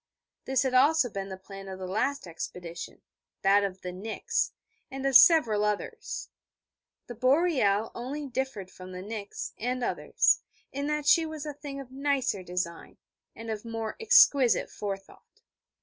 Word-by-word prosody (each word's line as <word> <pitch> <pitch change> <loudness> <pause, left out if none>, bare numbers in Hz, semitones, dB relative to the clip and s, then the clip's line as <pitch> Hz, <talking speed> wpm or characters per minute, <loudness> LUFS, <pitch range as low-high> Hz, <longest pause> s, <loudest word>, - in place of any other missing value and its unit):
This 265 -1 +2
had 260 -1 -1
also 270 0 +4
been 195 0 -5
the 190 - -6
plan 195 +1 -10
of 190 -1 -6
the 185 - -6
last 250 +9 -1
expedition 170 0 -7 0.4
that 200 +1 +5
of 190 -1 -4
the 180 - -5
Nix 205 +5 -2 0.4
and 270 0 -6
of 270 -1 +1
several 235 - +7
others. 210 -1 -3 0.8
The 240 - -7
Boreal 255 - +2
only 275 +5 -5
differed 260 -8 -4
from 185 0 -11
the 180 0 -7
Nix, 205 -1 -6
and 250 +2 -2
others, 475 - +2 0.3
in 280 +1 -3
that 300 -1 -1
she 330 +2 +6
was 310 -1 -6
a 295 - -4
thing 280 -1 -8
of 265 -2 -10
nicer 270 -6 0
design, 180 -2 -5 0.4
and 225 0 -6
of 215 -1 -4
more 225 -1 -4
exquisite 295 - +5
forethought. 195 -1 -8
230 Hz, 155 wpm, -28 LUFS, 195-275 Hz, 0.8 s, several